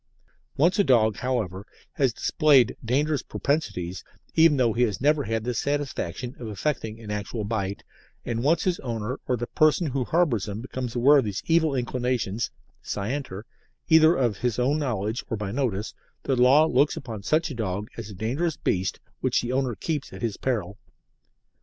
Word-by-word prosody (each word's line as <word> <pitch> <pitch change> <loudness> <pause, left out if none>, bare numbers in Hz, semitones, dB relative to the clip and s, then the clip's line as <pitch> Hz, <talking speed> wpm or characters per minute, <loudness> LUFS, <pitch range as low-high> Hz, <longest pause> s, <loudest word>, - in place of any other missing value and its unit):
Once 175 +7 +3
a - - +6
dog, 110 - +3
however, 110 -7 -2 0.3
has 135 -3 +1
displayed 135 0 +3
dangerous 140 +4 +1
propensities, 95 - -2 0.3
even 160 -2 +5
though 120 -4 +3
he 120 - -1
has 110 -6 +1
never 145 +1 +2
had 110 0 -1
the 125 +1 -2
satisfaction 130 -4 -3
of 120 - -6
effecting 110 0 -3
an 110 -2 -7
actual 105 +2 -3
bite, 100 -2 -3 0.4
and 115 -1 -2
once 160 +4 +3
his 180 -2 0
owner 115 0 -4
or 125 - +1
the 120 - -3
person 155 +6 +3
who 135 -3 -1
harbours 135 - +1
him 100 +1 -4
becomes 125 0 -5
aware 140 +4 +6
of 130 - 0
these 100 -2 -4
evil 160 -3 +3
inclinations 120 -4 -1 0.3
(scienter) 105 -1 -4 0.5
either 160 +1 +6
of 120 - +1
his 120 -1 -1
own 135 +5 +1
knowledge 110 -5 -2
or 115 - -2
by 100 -1 -4
notice, 110 -6 -2 0.3
the 135 - +1
Law 130 +5 +6
looks 140 -1 +2
upon 115 -6 -6
such 155 - 0
dog 105 -2 -3
as 115 -2 -7
a 100 - -9
dangerous 140 - -1
beast 95 0 -1 0.2
which - - +1
the 120 - -2
owner 130 -3 0
keeps 150 - -3
at - - -9
his 110 -4 -1
peril. 105 -6 -2
125 Hz, 175 wpm, -25 LUFS, 110-145 Hz, 0.5 s, a